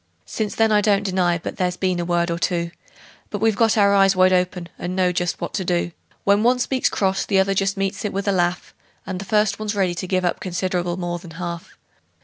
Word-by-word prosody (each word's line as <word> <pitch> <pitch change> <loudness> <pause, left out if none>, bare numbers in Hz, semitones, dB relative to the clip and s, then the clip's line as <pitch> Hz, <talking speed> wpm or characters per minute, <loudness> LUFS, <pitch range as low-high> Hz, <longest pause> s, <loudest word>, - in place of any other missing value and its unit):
Since 215 -2 -3
then 225 -1 +3
I 210 -1 +4
don't 205 -1 +2
deny 180 -3 +1
but 165 - -7
there's 180 -1 -1
been 185 -2 0
a 175 - -2
word 170 0 +1
or 170 - -2
two; 170 -1 -1 0.6
But 205 - -4
we've 220 0 +2
got 225 0 +3
our 200 -1 +5
eyes 195 -1 +4
wide 185 0 +4
open, 180 -1 0
and 180 +1 -4
know 185 -1 +2
just 175 0 -2
what - - -5
to 195 - -1
do: 175 -1 0 0.3
When 200 +1 +3
one 245 +3 +3
speaks 255 +1 0
cross 195 -1 0
the 195 - 0
other 190 +1 +3
just 195 0 0
meets 195 0 -2
it 210 - -2
with 200 +2 -3
a - - +4
laugh, 175 -1 -1 0.3
And 185 - -4
the - - -7
first 210 +1 +1
one's 215 -1 -3
ready 190 -3 +1
to 185 +1 -5
give 185 0 0
up 175 - 0
considerable 180 -1 -2
more 175 -1 -3
than 170 - -12
half. 170 -1 -6
185 Hz, 240 wpm, -22 LUFS, 175-200 Hz, 0.6 s, our